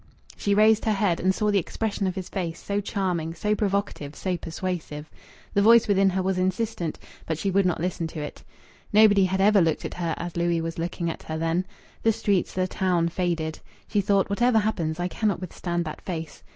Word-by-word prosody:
She 200 0 0
raised 215 +1 +5
her 220 - +3
head 195 -4 +1
and 185 - +3
saw 210 +2 0
the 200 - +3
expression 200 +2 -2
of 185 - -2
his 190 -2 -5
face, 170 -4 -4
so 200 0 -2
charming, 175 -5 -2
so 210 +2 0
provocative, 200 -8 -2
so 185 -1 -2
persuasive. 165 -3 -5 0.4
The 200 - +3
voice 230 +2 +6
within 195 -1 +4
her 190 0 -1
was 190 0 0
insistent, 185 -3 -1 0.3
but 160 - -1
she 195 +4 -1
would 195 0 +3
not 175 - 0
listen 170 -1 -2
to 160 0 -7
it. 150 - -7 0.5
Nobody 205 -2 +6
had 190 +1 0
ever 205 0 +5
looked 165 -2 +1
at - - -4
her 170 -2 -2
as 175 0 -5
Louis 170 0 +1
was 165 0 -4
looking 170 0 -2
at - - -9
her 160 - -5
then. 165 +3 0 0.3
The 225 - +4
streets, 200 -3 0
the 185 0 +1
town 180 -3 +1
faded. 170 -3 -2 0.3
She 205 - +1
thought: 200 -1 +2
"Whatever 240 +3 +2
happens, 180 -7 0
I 175 - 0
cannot 205 0 -1
withstand 175 -1 -3
that 155 - -6
face." 165 -4 -6
185 Hz, 205 wpm, -25 LUFS, 170-200 Hz, 0.5 s, voice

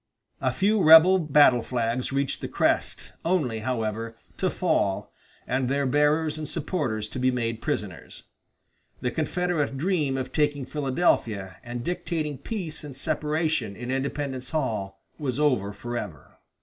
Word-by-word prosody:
A 130 - +2
few 200 - +2
rebel 165 +4 +8
battle 145 -6 +5
flags 120 +1 -2
reached 135 0 -1
the - - -3
crest, - - 0
only, 150 -11 0
however, 115 -1 -3 0.2
to 185 - +1
fall, 155 - 0 0.3
and 130 0 0
their 140 +1 +1
bearers 150 +3 +2
and 155 -2 -4
supporters 140 - -2
to 130 - -6
be 130 0 +3
made 115 -3 -2
prisoners. 90 -10 -4 0.8
The 125 -1 -1
Confederate 160 -3 -1
dream 150 -4 0
of 130 - -4
taking 145 -3 +1
Philadelphia 130 - 0
and 120 0 -5
dictating 155 -3 -3
peace 170 -3 -5
and 140 -3 -8
separation 150 -7 -1
in 120 +4 -5
Independence 135 -1 -3
Hall 105 -11 -3 0.2
was 135 -3 -2
over 125 -10 +2
forever. 105 - -7
135 Hz, 135 wpm, -26 LUFS, 120-155 Hz, 0.8 s, rebel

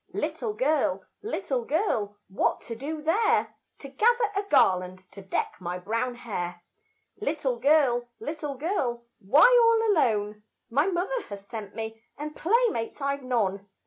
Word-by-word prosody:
Little 430 - -2
girl, 305 - +1 0.2
little 370 - -2
girl, 230 - -1
what 190 - 0
to 230 - -7
do 300 +5 -5
there? 435 +8 +2 0.2
To 275 - -9
gather 445 - +2
a 400 - +2
garland 185 - +3
to 200 +1 -10
deck 190 - -2
my 180 -1 -4
brown 230 +7 -2
hair. 175 -7 -5 0.5
Little 290 - -1
girl, 255 -3 +3
little 300 -2 -4
girl, 255 -6 -2
why 265 +11 +6 0.2
all 455 -1 +4
alone? 210 - +1 0.3
My 290 +8 +3
mother 390 +7 -1
has 200 -1 -8
sent 215 -3 -7
me, 225 0 -6 0.2
and 300 +1 -6
playmates 415 - +1
I've 280 0 -1
none. 205 -6 -1
255 Hz, 145 wpm, -27 LUFS, 210-325 Hz, 0.5 s, why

